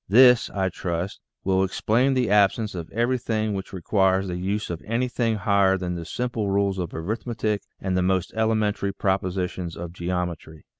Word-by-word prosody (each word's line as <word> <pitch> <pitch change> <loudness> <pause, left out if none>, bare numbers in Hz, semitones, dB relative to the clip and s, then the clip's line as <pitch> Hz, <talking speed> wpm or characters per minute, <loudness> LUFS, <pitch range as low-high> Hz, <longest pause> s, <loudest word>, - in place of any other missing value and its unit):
This, 125 +2 +7
I 95 -1 -1
trust, 90 +1 -4 0.2
will 95 0 +2
ex 95 - -3
plain 125 +5 +3
the 125 -5 +1
absence 105 +1 +3
of 85 -3 -6
everything 115 -2 0
which 95 -1 -5
requires 95 +1 +1
the 90 - -3
use 100 +3 -2
of 85 - -5
anything 115 0 0
higher 100 -1 +3
than 90 -1 -3
the 85 -1 -5
simple 115 0 -2
rules 100 -1 +1
of 90 -2 -3
arithmetic 110 +3 -2 0.2
and 95 -1 -1
the 90 - +2
most 95 -1 0
elementary 110 -3 +1
propositions 90 -3 -1
of 85 0 -6
geometry. 85 -3 -4
95 Hz, 165 wpm, -24 LUFS, 90-110 Hz, 0.2 s, This